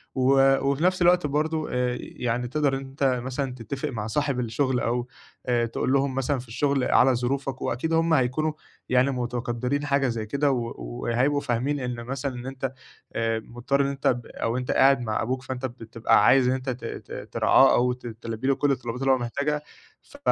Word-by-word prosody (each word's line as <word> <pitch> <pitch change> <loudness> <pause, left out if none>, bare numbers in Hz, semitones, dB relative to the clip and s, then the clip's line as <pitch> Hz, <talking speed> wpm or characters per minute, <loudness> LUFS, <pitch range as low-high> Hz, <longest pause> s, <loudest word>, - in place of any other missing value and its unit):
و 135 +1 +5
وفي 140 +3 0
نفس 185 0 +2
الوقت 175 -2 +4
برضه 155 +2 -1
آآ، 125 0 0
يعني 125 0 -3
تقدر 145 +1 +1
إن - - -6
أنت 135 +1 -6 0.2
مثلًا 130 0 -3
تتِّفق 130 +3 -4
مع 110 -4 -4
صاحب 140 +2 0
الشغل 125 +2 0
أو 120 +1 -1 0.4
آآ، 120 -1 +2
تقول 120 +3 -1
لهم 140 -1 +1
مثلًا 135 +1 0
في 125 - -10
الشغل 140 +3 0
على 130 +1 +4
ظروفك، 130 +2 -2
وأكيد 160 +8 -1
هم 165 0 +3
هيكونوا 155 +3 +2 0.4
يعني 125 +2 +3
متقدّرين 125 +2 -2
حاجة 140 -1 +2
زي 115 -3 -2
كده، 140 +6 +1
و 120 -3 -2
وهيبقوا 120 - 0
فاهمين 140 +2 -1
إن 125 -2 -4
مثلًا 135 +2 -4
إن 120 0 -7
أنت 135 0 -4 0.4
آآ، 115 0 0
مُضطّر 120 +5 -1
إن 140 - +1
أنت 140 0 -2
ب 120 -1 +1
أو 115 +2 -2
أنت 125 0 -2
قاعد 135 0 +5
مع 110 -3 -1
أبوك، 130 +3 -2
فأنت 130 0 -4
بت 120 -1 -7
بتبقى 115 +1 +3
عايز 130 0 +5
إن 130 - +3
أنت 130 0 -3
ت 125 0 -5
ت - - -7
ترعاه - - +5
أو 125 +1 +2
ت 125 -1 -9
تلبّي 115 +1 -5
لُه 135 - +3
كل 145 +1 +1
الطلبات 125 -1 -3
اللي 135 0 +3
هو 130 - +4
محتاجها، 140 +5 -2 0.4
ف - - -16
130 Hz, 200 wpm, -25 LUFS, 120-140 Hz, 0.4 s, و